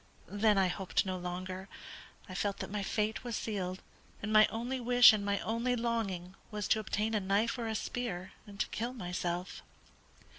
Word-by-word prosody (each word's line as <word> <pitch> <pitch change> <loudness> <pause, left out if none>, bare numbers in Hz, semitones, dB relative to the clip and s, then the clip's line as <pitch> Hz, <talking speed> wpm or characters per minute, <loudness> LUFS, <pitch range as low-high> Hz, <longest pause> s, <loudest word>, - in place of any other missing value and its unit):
Then 205 +1 +3
I 190 -1 +4
hoped 185 +2 0
no 185 -1 -2
longer. 185 +1 -5 0.6
I 185 - -8
felt 200 +1 -1
that - - -6
my 210 0 -1
fate 215 +3 -1
was 240 -2 -3
sealed, 190 -5 -3 0.4
and 215 +1 -1
my 215 0 +8
only 245 +4 -3
wish 245 -1 +8
and 210 -1 -1
my 200 0 +1
only 235 +3 0
longing 220 -7 -2 0.2
was 210 -3 -3
to 220 - +4
obtain 215 +1 -1
a 215 - +3
knife 200 +5 +1
or 230 - -2
a 220 - -2
spear, 205 -6 -3 0.2
and 200 0 -11
to - - +1
kill 235 +3 -3
myself." 180 -4 -3
210 Hz, 185 wpm, -32 LUFS, 185-225 Hz, 0.6 s, my